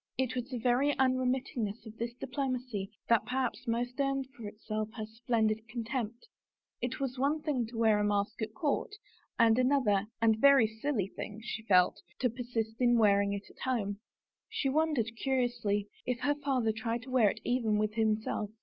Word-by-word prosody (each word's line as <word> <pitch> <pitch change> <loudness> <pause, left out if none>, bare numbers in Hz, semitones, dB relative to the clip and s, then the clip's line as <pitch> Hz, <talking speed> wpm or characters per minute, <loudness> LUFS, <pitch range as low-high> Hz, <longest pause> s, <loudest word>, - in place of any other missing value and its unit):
It 255 -1 0
was 250 0 -3
the 255 - -3
very 250 +5 +2
unremitting 255 -2 +1
ness 205 +4 -7
of 220 0 -10
this 235 +1 -3
diplomacy 250 -7 -3 0.2
that 230 -2 +4
perhaps 255 0 -2
most 245 +3 -1
earned 275 -1 +1
for 225 -3 -7
itself 215 +1 -4
her 215 -3 -4
splendid 220 -1 0
contempt; 235 - -4 0.5
it 245 +1 -2
was 270 -2 -3
one 295 +3 +1
thing 260 -7 0
to 230 0 -9
wear 220 -2 +4
a - - +1
mask 205 +2 0
at 220 0 -3
court, 295 - -1 0.4
and 230 0 +5
another, 250 -7 +3
and 220 -1 +3
very 280 -3 +7
silly 220 -2 -2
thing, 210 0 -6
she 230 -1 -4
felt, 185 -5 +3 0.2
to 250 -3 +1
persist 235 -1 -3
in 240 -1 +5
wearing 200 -2 +4
it 200 0 -5
at - - -22
home. 210 -6 -1 0.5
She 270 - -1
wondered, 275 -6 +1
curiously, 240 -6 0 0.2
if 250 -1 -2
her 290 - +2
father 270 -6 0
tried 230 +2 -3
to 255 - -10
wear 240 -5 +5
it - - -5
even 230 -4 +1
with 215 0 0
him 220 -1 +3
self. 215 -1 -3
235 Hz, 185 wpm, -31 LUFS, 215-255 Hz, 0.5 s, very